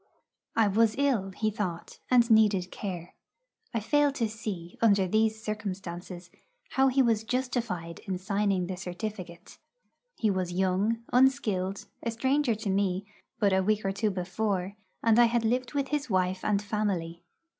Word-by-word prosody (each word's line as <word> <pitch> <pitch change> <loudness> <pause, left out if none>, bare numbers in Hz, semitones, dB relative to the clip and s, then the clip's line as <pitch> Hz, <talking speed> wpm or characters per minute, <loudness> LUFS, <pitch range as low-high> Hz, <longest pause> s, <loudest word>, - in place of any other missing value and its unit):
I 225 -2 +4
was 215 +2 +3
ill, 260 -9 +1
he 215 +3 -1
thought, 185 -5 -5
and 245 -2 +5
needed 210 -5 +4
care. 180 -4 -6 0.6
I 230 - -1
fail 290 +6 +2
to 235 -5 0
see, 210 -6 -6
under 200 -4 +4
these 220 +2 +1
circumstances, 185 -4 -5 0.4
how 265 0 +3
he 265 +1 +3
was 225 -3 +2
justified 235 -9 -2
in 190 -1 -1
signing 195 -1 0
the 185 0 -5
certificate. 180 -1 -7 0.6
He 215 -3 +1
was 185 -2 -2
young, 190 +5 +1
unskilled, 210 -7 +2 0.2
a 235 - -2
stranger 260 +2 +1
to 215 -1 -4
me 190 0 0 0.3
but 200 -2 +2
a 190 - +3
week 210 +1 0
or 195 - +1
two 210 +2 0
before, 190 +1 -2 0.3
and 225 0 +5
I 240 - +8
had 235 0 +1
lived 250 +4 0
with 275 -1 0
his 295 -2 -2
wife 185 -1 0
and 205 -1 +1
family. 190 -6 -2
210 Hz, 155 wpm, -28 LUFS, 185-230 Hz, 0.6 s, I